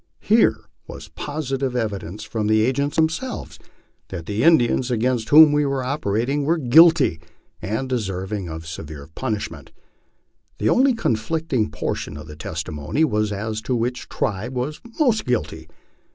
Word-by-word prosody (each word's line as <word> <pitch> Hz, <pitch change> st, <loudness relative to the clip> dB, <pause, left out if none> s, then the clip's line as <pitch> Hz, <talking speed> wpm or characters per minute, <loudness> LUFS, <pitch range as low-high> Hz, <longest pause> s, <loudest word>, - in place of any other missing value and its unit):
Here 220 Hz, +2 st, +3 dB, 0.3 s
was -, -, -10 dB
positive 135 Hz, -3 st, -3 dB
evidence 105 Hz, -4 st, -3 dB
from 110 Hz, -1 st, -3 dB
the 110 Hz, 0 st, +3 dB
agents 135 Hz, +5 st, 0 dB
themselves 160 Hz, +11 st, -2 dB, 0.5 s
that 85 Hz, -4 st, -7 dB
the 105 Hz, +4 st, -2 dB
Indians 130 Hz, -5 st, +4 dB
against 120 Hz, -1 st, 0 dB
whom 155 Hz, 0 st, +9 dB
we 145 Hz, 0 st, +2 dB
were 135 Hz, -2 st, -1 dB
operating 130 Hz, +1 st, -1 dB
were 165 Hz, +4 st, +2 dB
guilty, 155 Hz, -, +5 dB, 0.4 s
and 110 Hz, +8 st, -2 dB
deserving 95 Hz, -5 st, -3 dB
of 80 Hz, 0 st, -7 dB
severe 80 Hz, -2 st, -8 dB
pun 120 Hz, +1 st, -2 dB
ishment. 105 Hz, -, -8 dB, 0.9 s
The 105 Hz, -, +1 dB
only 265 Hz, -, +4 dB
conflicting 130 Hz, -, -1 dB
portion 75 Hz, -, -4 dB
of 75 Hz, -, -9 dB
the 75 Hz, -1 st, -10 dB
testimony 80 Hz, -, -3 dB
was 105 Hz, -7 st, +1 dB
as 110 Hz, +2 st, -3 dB
to 125 Hz, +3 st, -1 dB
which 120 Hz, +2 st, -2 dB
tribe 110 Hz, +5 st, -3 dB
was 130 Hz, +5 st, -3 dB, 0.2 s
most 240 Hz, -8 st, +3 dB
guilty. 80 Hz, -10 st, -3 dB
120 Hz, 145 wpm, -22 LUFS, 100-145 Hz, 0.9 s, whom